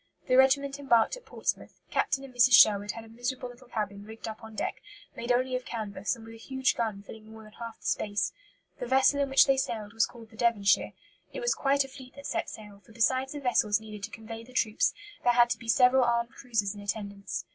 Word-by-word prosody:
The 255 - +3
regiment 275 +1 +4
embarked 240 - +3
at - - -15
Portsmouth. - - -4
Captain 270 - 0
and 270 -2 -11
Mrs. 245 0 +5
Sherwood 205 -3 +6
had 230 - -8
a - - -14
miserable 245 +2 -4
little 245 +1 -15
cabin 205 -4 -4
rigged 220 +2 -9
up 220 +1 -7
on 220 -1 -10
deck, - - -3 0.3
made 235 +1 -3
only 255 +1 +1
of 255 - -3
canvas, 215 -2 -3
and 225 -2 -13
with 225 - -11
a - - -11
huge 265 +2 0
gun 215 -4 -2
filling 220 +1 -12
more 220 0 -11
than 215 - -14
half 230 0 -9
the - - -19
space. 205 -2 0 0.5
The 245 - -4
vessel 265 +2 +4
in 280 - 0
which 270 - +6
they 270 -1 +3
sailed 220 -5 -3
was 225 0 +2
called 230 -2 -14
the 220 - -16
Devonshire. 215 -5 +2 0.4
It - - -4
was 485 - +2
quite 280 0 +2
a - - -9
fleet 260 -1 -13
that 280 0 -11
set - - -2
sail, 210 -2 -11
for 220 - -18
besides 260 +4 +1
the 295 - -5
vessels 220 -5 +2
needed 215 -1 -10
to - - -5
convey 225 0 -9
the 255 +2 -16
troops, 220 -4 +2 0.3
there 245 - +4
had 240 0 +5
to 220 - -1
be 230 - -11
several 250 +3 +5
armed 235 0 +1
cruisers 225 -7 -2
in 205 - -10
attendance. 200 -1 -4
235 Hz, 235 wpm, -29 LUFS, 215-260 Hz, 0.5 s, Sherwood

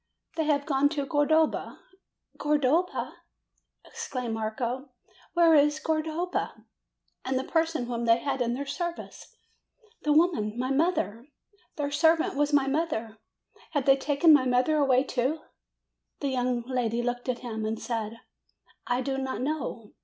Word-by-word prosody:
"They 320 - 0
have 285 -2 +1
gone 285 -2 +2
to 285 - 0
Cordova." 310 +2 +1 0.6
"Cordova 300 +4 +1 0.3
!" - - -37
exclaimed 250 -4 -5
Marco. 235 +5 -3 0.5
"Where 335 -1 +6
is 295 0 +4
Cordova? 320 +3 -2 0.6
And 260 0 -1
the 260 - -1
person 325 -5 0
whom 235 -1 -3
they 230 0 +5
had 265 +1 -2
in 240 0 0
their 280 +2 -4
service? 335 +5 -6 0.7
The 300 - 0
woman, 295 -10 +2
my 255 +2 -1
mother! 270 - 0 0.5
Their 285 -1 -2
servant 320 0 +3
was 295 +1 +1
my 285 -2 +4
mother! 270 -7 -2 0.5
Have 285 -4 0
they 270 - +6
taken 290 +4 +4
my 260 -3 +4
mother 250 +5 +2
away, 265 -3 +4
too?" 275 +4 -1 0.8
The 280 - -1
young 250 -2 0
lady 240 -2 -1
looked 245 +1 -3
at 245 -1 -2
him 220 -2 -4
and 220 +1 -2
said: 230 -1 -4 0.7
"I 245 +1 +1
do 270 +1 -2
not 265 -1 -3
know. 265 -6 -4
270 Hz, 145 wpm, -27 LUFS, 245-305 Hz, 0.8 s, Where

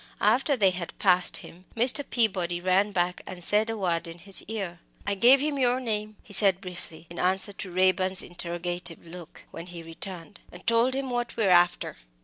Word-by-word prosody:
After 255 +7 +2
they 195 -4 +3
had 180 -2 -7
passed 180 -2 +3
him, 180 +2 -15
Mr. 255 +5 +4
Peabody 185 -9 -1
ran 185 +3 +1
back 180 -1 -1
and 180 -2 -5
said 210 +5 +4
a 225 - -3
word 170 -3 -1
in 165 0 -9
his 190 +3 -3
ear. 195 -6 -5 0.3
"I 200 - -1
gave 245 +7 +5
him 290 -1 -2
your 250 0 +1
name," 215 -3 -4
he 205 - -11
said 195 -2 +6
briefly, 175 -3 -10
in 170 - -8
answer 190 +3 +2
to 195 - -7
Raeburn's 185 +1 +2
interrogative 175 0 -5
look, 170 -1 -12
when 165 +2 -9
he 175 -2 -9
returned, 175 +3 -6
"and - - -14
told 235 +3 +2
him 270 -1 -3
what 240 -1 -3
we 225 - 0
were 195 - +3
after. 175 0 +2
190 Hz, 195 wpm, -26 LUFS, 175-220 Hz, 0.3 s, said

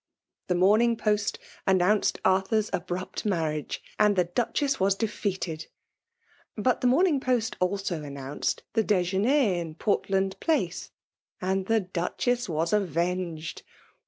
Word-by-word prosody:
The 180 - +1
Morning 215 +6 +4
Pogt 210 -2 0 0.3
announced 190 +2 +3
Arthur^s 190 +3 +2
abrupt 180 +1 -3
marriage, 160 -7 -2 0.2
and 210 -1 +4
the 180 -2 +3
DucheBs 245 - 0
was 195 +1 +3
defeated; 190 -6 -3 0.9
but 245 +4 +1
the 250 - +3
Morning 300 +3 +4
Post 250 -4 0
also 180 -3 -1
an 145 -1 -7
nounced 140 +1 -3
the 225 - +2
dejeuner 200 +2 +2
in 160 -2 -7
Portland 195 0 0
Place 320 -2 0 0.3
— - - -70
and 190 +1 -1
the 225 -1 +3
Duchess 195 +6 -1
was 165 +2 0
avenged. 175 -3 -1
190 Hz, 130 wpm, -27 LUFS, 175-220 Hz, 0.9 s, Morning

